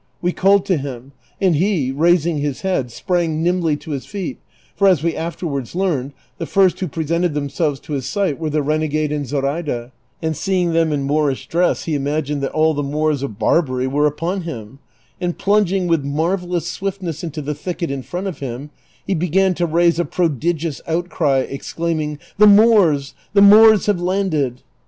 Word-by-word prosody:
We 175 - 0
called 195 +2 +3
to 185 - +1
him, 135 -2 -7 0.3
and 185 -4 +3
he, 165 -6 +1
raising 165 +2 +2
his 145 -2 -3
head, 185 -10 -1
sprang 165 +2 -1
iiimljly 170 -4 +1
to 160 - -8
his 140 -3 -4
feet, 195 -4 -5 0.4
for, 200 - +3
as 175 -6 +3
we 170 -1 0
afterwards 160 -5 -4
learned, 155 -8 -1 0.3
the - - -4
first 190 -2 +3
who 185 - -2
pre 160 +1 -4
sented 170 0 0
themselves 145 0 -1
to 150 - -7
his 135 -3 -3
sight 195 -9 -1
were 160 -2 -2
the 150 0 0
renegade 155 0 0
and 145 -2 -2
Zoraida, 140 -2 -2 0.3
and 160 -1 -2
seeing 180 0 0
them 165 -1 +2
in 140 -2 -1
^loorish 145 -2 0
dress 175 +2 +1
he 165 - -3
imagined 145 0 -1
that 135 - -2
all 155 0 +2
the 145 - -2
]Moors 150 0 -1
of 115 -8 -5
Bar 110 +10 +3
bary 130 -4 -3
were 145 +3 +2
upon 165 +6 -2
him; 135 -7 -8 0.4
and 175 -1 -2
plunging 195 -2 +2
with 165 -4 +1
marvellous 170 +4 -1
swiftness 185 -4 -4
mto 155 -3 -5
the 150 - -2
thicket 170 0 -4
in 140 -1 -3
front 180 +8 -5
of 190 -4 -5
him, 135 +2 -6 0.3
he 195 - -1
began 180 +2 +2
to 175 0 -1
raise 170 +1 +2
a - - +3
prodigious 165 -1 -1
outcry, 160 -5 0
ex 140 - -7
claiming, 155 -3 -2 0.2
"The 210 - +8
Moors 200 -10 +5
— - - -36
the 200 - +7
Moors 215 0 +7
have 205 -4 +1
landed!" 175 -9 -1
160 Hz, 190 wpm, -19 LUFS, 145-180 Hz, 0.4 s, The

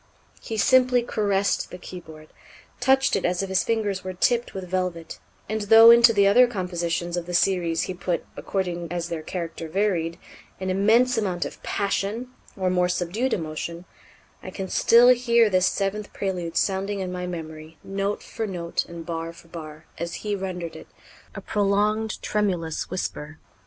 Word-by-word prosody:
He 220 - -5
simply 255 +1 +4
caressed 200 -4 0
the - - -8
keyboard, 160 -4 -11 0.5
touched 265 +2 +3
it - - -1
as 180 +2 0
if 195 - -4
his 190 0 +2
fingers 210 -4 -1
were 185 0 -5
tipped 240 +5 +1
with 190 -1 -5
velvet; 180 -2 -3 0.3
and 215 +1 -2
though 225 +1 +10
into 235 0 +7
the 200 -3 +3
other 245 +6 +6
compositions 175 -5 -2
of 175 -1 -4
the 175 - -3
series 170 -3 +1
he 185 - -4
put, 180 -1 -3
according 175 -3 -3
as 175 -1 -3
their 165 -2 -4
character 165 0 -5
varied, 170 -3 0 0.4
an 185 0 -2
immense 225 +6 +3
amount 185 -5 -1
of - - -8
passion, 205 +4 -2 0.3
or 185 -1 0
more 180 -1 +2
subdued 190 +9 -1
emotion, 165 +1 -4 0.6
I - - -8
can 190 0 -6
still 240 +2 +6
hear 235 -3 +4
this 185 0 +3
seventh 200 +1 -2
Prélude 180 -4 -3
sounding 195 +1 0
in 185 -1 -3
my 180 0 -4
memory, 160 -2 -8
note 195 +1 -3
for 225 -1 -4
note 170 -3 -3
and 170 -1 -9
bar 165 0 -4
for 165 0 -17
bar, 155 -2 -9
as 170 0 -4
he 205 -1 0
rendered 180 -4 -5
it - - -11 0.5
a - - -6
prolonged, 210 +2 0
tremulous 180 -7 -1
whisper. 155 -4 -5
185 Hz, 165 wpm, -24 LUFS, 170-210 Hz, 0.6 s, though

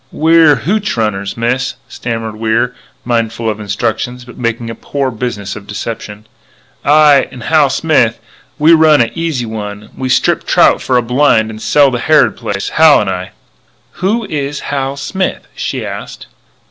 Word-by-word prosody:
"We're 160 -1 +5
h 130 - -4
hootch 210 - -1
runners, 100 -2 -2
Miss 120 +2 -1
" - - -39
stammered 115 -2 -5
Wier, 115 +2 0 0.3
mindful 115 -1 -1
of 105 - -7
instructions, 115 +4 -3
but 125 - -13
making 115 -1 -3
a - - -5
poor 135 +2 -3
business 110 -4 -4
of 105 -1 -10
deception; 105 0 -6 0.4
" - - -35
I 145 -2 +5
and 125 - -10
Hal 155 -3 +3
Smith, 135 -5 +1 0.4
we 155 +2 +5
run 155 -3 +5
a 115 - 0
'Easy 165 -7 -2
One,' 105 -2 -6
and - - -19
we 130 -1 -2
strip - - +2
trout - - +3
for 130 - +1
a 120 - +1
blind 115 -3 +2
and 110 0 -10
sell 145 -2 +4
to 120 - -2
Harrod 145 -5 +3
Place 100 -1 -4
Hal 160 -1 +5
and 100 -2 -1
I 90 0 -5 0.3
" - - -39
"Who 215 +5 0
is 145 -4 -4
Hal 135 -1 -2
Smith?" 190 +7 -3
she - - -4
asked. - - -7
125 Hz, 180 wpm, -14 LUFS, 110-145 Hz, 0.4 s, We're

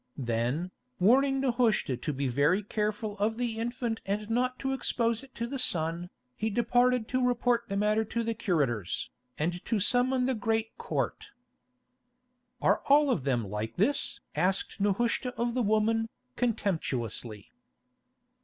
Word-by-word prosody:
Then, 125 +8 -1 0.3
warning 270 +8 +4
Nehushta 235 - +2
to 125 +5 -3
be 140 -1 -2
very 145 - +2
careful 210 0 -2
of 220 +2 0
the 235 -2 -2
infant 235 -1 -2
and 210 +2 -3
not 250 +2 +1
to 270 0 -2
expose 235 -2 0
it 270 - -16
to 235 - -2
the 270 +3 -4
sun, 170 -5 +1 0.3
he 220 - -1
departed 245 +1 +2
to 255 0 +1
report 245 -1 +2
the 200 - -2
matter 210 +2 +2
to 235 +2 -2
the 230 0 -1
curators, 135 - -1 0.3
and 175 +3 -2
to 225 - 0
summon 250 +4 +2
the 260 - +1
great 225 -1 -1
Court. 465 - -3 1.3
"Are - - +3
all 285 0 +5
of 140 - -1
them 120 -6 0
like 105 +3 -4
this?" 235 +10 +1
asked 185 +5 0
Nehushta 235 +5 0
of 235 +1 -1
the 250 - 0
woman, 225 +1 +2 0.3
contemptuously. 130 - -2
220 Hz, 145 wpm, -29 LUFS, 175-245 Hz, 1.3 s, all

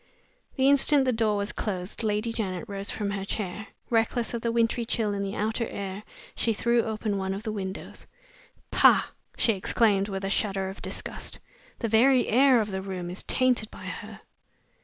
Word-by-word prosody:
The 265 -1 +3
instant 280 0 +5
the 255 - +3
door 220 -3 +1
was 200 +1 -1
closed 190 -2 -4
Lady 215 +1 -1
Janet 195 -3 -3
rose 200 -1 -3
from 205 -2 -2
her 195 -1 -3
chair. 200 +1 -4 0.2
Reckless 230 +1 +1
of 235 - -3
the 230 - 0
wintry 230 +1 +1
chill 225 -2 -1
in 200 - -2
the 200 +1 -3
outer 220 +2 -1
air, 195 0 -5 0.3
she 230 - +1
threw 235 +2 +2
open 215 -2 -2
one 190 0 -2
of 200 - -7
the 220 - -3
windows. 190 -2 -6 0.6
"Pah!" - - +5 0.3
she 225 - +4
exclaimed, 200 0 +2
with 195 0 -4
a - - -1
shudder 195 -3 0
of 190 - -9
disgust, - - -4 0.4
"the 230 - -2
very 245 +4 +4
air 260 +1 +5
of 210 -2 -2
the 190 0 -3
room 185 -2 -5
is 180 - -4
tainted 250 -4 +2
by - - -11
her!" - - -7
215 Hz, 185 wpm, -27 LUFS, 195-230 Hz, 0.6 s, instant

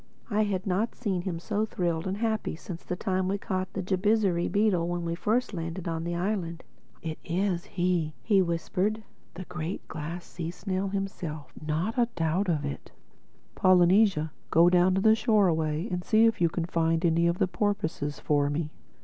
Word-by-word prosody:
I 210 +1 +2
had 190 -2 -2
not 200 +4 0
seen 195 -7 -1
him 175 -2 -3
so 210 +4 -1
thrilled 175 -5 -1
and 190 +1 -2
happy 220 -5 -1
since 170 +1 -8
the 180 - -3
time 185 -1 -1
we 195 +2 0
caught 185 -2 -3
the 195 - -3
Jabizri 190 -1 +2
beetle 200 -5 +2
when 175 0 -2
we 165 - -1
first 220 +7 0
landed 170 +1 -4
on 165 -1 -2
the 175 0 -2
island. 175 -2 -2 0.4
"It 160 -1 -4
is 180 0 -1
he!" 175 -4 0
he 200 -4 +4
whispered—"the 185 +3 -3
Great 175 0 -5
Glass 165 +3 -6
Sea 165 -2 -5
snail 190 +2 -2
himself—not 175 - -3
a 240 - +4
doubt 170 +4 0
of 150 -4 0
it. 140 - -6 0.6
Polynesia, 185 -3 +4 0.2
go 170 +2 +5
down 180 +1 +4
the 215 +3 +5
shore 220 -3 +3
away 160 +1 0
and 180 0 -2
see 220 +3 +4
if 225 -5 +2
you 170 - +4
can 165 +1 -2
find 165 0 +1
any 170 0 +3
of 170 +1 +1
the - - +2
porpoises 175 -8 -2
for 145 -1 +1
me. 150 +1 -2
180 Hz, 175 wpm, -28 LUFS, 165-200 Hz, 0.6 s, go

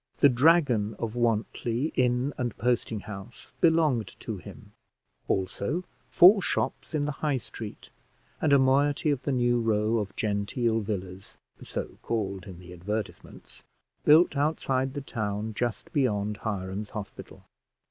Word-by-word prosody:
The 145 - +6
Dragon 125 -6 +3
of 110 -1 -3
Wantly 120 +3 0
inn 125 +2 +1
and 120 -3 -3
posting 115 -2 0
house 100 +3 -10
belonged 155 - +2
to - - -4
him, - - -12 0.6
also 100 - -1 0.3
four 195 +3 +7
shops 175 - -2
in 145 -1 +1
the 150 - -1
High 150 -3 +1
Street, 110 -3 -9 0.5
and 155 - +2
a 140 - +7
moiety 140 +3 +3
of 140 -3 -1
the 140 - -2
new 120 -2 +2
row 110 0 +1
of 100 -2 -5
genteel 110 +2 0
villas 95 -3 -5 0.2
(so - - -6
called 100 -5 -3
in 95 -3 -9
the 90 0 -12
advertisements), 105 +5 -6 0.4
built 155 +1 +6
outside 135 -2 0
the 145 - -3
town 110 -4 -3
just 120 +1 -3
beyond 105 -7 0
Hiram's 100 -1 -4
Hospital. 105 - -9
115 Hz, 135 wpm, -27 LUFS, 105-140 Hz, 0.6 s, four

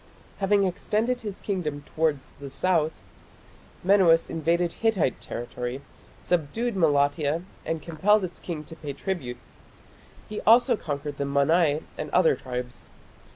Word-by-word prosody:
Having 200 0 +3
extended 215 +6 0
his 205 -3 -6
kingdom 155 -8 -3
towards 155 -3 -1
the 140 -1 -7
south, 160 +2 0 0.8
Menuas 180 -4 +5
invaded 165 +1 +1
Hittite 220 - +1
territory, 125 +2 -5 0.4
subdued 190 +8 -1
Malatia 150 -1 +2 0.2
and 165 -2 -2
compelled 190 +6 +3
its 180 -1 -5
king 160 -4 -5
to 165 - -11
pay 145 -3 -6
tribute. 135 -9 -4 0.9
He 210 - -5
also 240 +2 +5
conquered 145 -5 -5
the 140 - 0
Mannai 145 +2 +2 0.2
and 150 - -3
other 175 +2 +4
tribes. 125 -1 -6
165 Hz, 125 wpm, -26 LUFS, 145-190 Hz, 0.9 s, Menuas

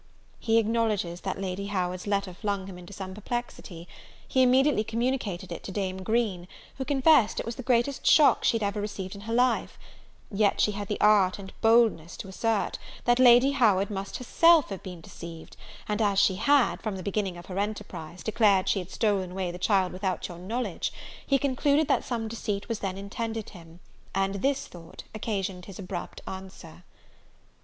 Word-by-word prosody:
He 225 -1 +2
acknowledges 215 -6 0
that 190 0 -4
Lady 195 +1 -3
Howard's 185 -1 -2
letter 200 -2 -1
flung 200 0 -3
him 185 -2 -9
into 175 +2 -12
some 190 -1 -7
perplexity: 210 -5 -6 0.4
he 260 - +2
immediately 260 -1 +4
communicated 225 -5 -2
it - - -5
to - - -5
Dame 190 -1 -3
Green, 200 -4 -1 0.3
who 265 - -2
confessed 270 -3 +4
it - - -3
was 230 0 -4
the - - -6
greatest 255 +2 0
shock 300 - +6
she 230 - +3
had 220 - -3
ever 200 +1 -2
received 195 -2 -5
in 200 - -9
her 225 +2 -5
life; 250 -1 +1 0.5
yet 200 -1 +2
she 210 - +3
had 205 0 -5
the 210 - -3
art 205 -3 +4
and 190 -1 -10
boldness 225 -8 +3
to - - -7
assert, 215 +2 -1 0.3
that 240 +1 +3
Lady 250 +2 +7
Howard 210 -7 +3
must 195 -1 -4
herself 330 +4 +4
have 195 -2 -6
been 180 -3 -9
deceived: 165 0 -10 0.3
and 210 0 -1
as 200 -2 +2
she 195 -2 +4
had, 280 +3 +3
from 215 -3 -3
the 185 - -6
beginning 195 -2 -2
of 175 - -10
her 190 0 -4
enterprise, 200 -5 -5
declared 210 -4 +3
she 200 - +2
had 180 -1 -7
stolen 195 -5 0
away 185 -2 -2
the 175 - -8
child 190 -1 +2
without 185 0 -2
your 175 -2 -9
knowledge, 230 +7 -3 0.4
he 275 - +4
concluded 280 +2 +1
that - - +2
some 230 -3 -3
deceit 215 -2 -4
was 230 -2 -3
then 190 -1 -3
intended 220 +2 -5
him; 165 -1 -14 0.4
and 195 0 0
this 275 +2 0
thought 165 -1 -12
occasioned 195 -4 -3
his 195 - -10
abrupt 180 -2 -6
answer. 190 -3 -9
205 Hz, 185 wpm, -27 LUFS, 185-230 Hz, 0.5 s, Lady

